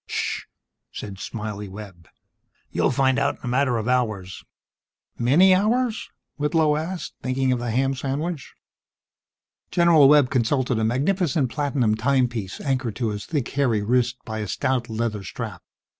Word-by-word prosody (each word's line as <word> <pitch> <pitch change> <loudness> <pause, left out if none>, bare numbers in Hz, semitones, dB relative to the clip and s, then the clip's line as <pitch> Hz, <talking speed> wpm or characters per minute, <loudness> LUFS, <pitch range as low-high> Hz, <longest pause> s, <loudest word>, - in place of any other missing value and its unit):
"Ssssh!" - - -2 0.5
said 100 -2 -7
"Smiley" 105 -2 -5
Webb. 95 -5 -11 0.6
"You'll - - +1
find 135 0 +2
out 140 0 +1
in - - -27
a - - -5
matter 125 0 +1
of 110 0 -3
hours." 110 -8 -1 0.8
"Many 160 +11 +5
hours?" 220 +3 +1 0.3
Whitlow 150 0 +2
asked, 165 +4 -4
thinking 130 0 0
of 125 - +1
the 120 0 -3
ham 135 +4 +1
sandwich. 140 +4 -4 1.1
General 170 -5 +5
Webb 145 -3 +5
consulted 125 -1 +1
a - - 0
magnificent 140 - +1
platinum 135 -4 +1
timepiece 120 -4 0
anchored 130 -6 -1
to 120 -3 -1
his 105 -1 -5
thick 145 -7 -2
hairy 125 -7 +1
wrist 120 +2 +1
by 110 -2 -4
a 105 - -3
stout 125 +3 -1
leather 110 -2 -2
strap. 90 - -6
130 Hz, 145 wpm, -23 LUFS, 110-145 Hz, 1.1 s, Many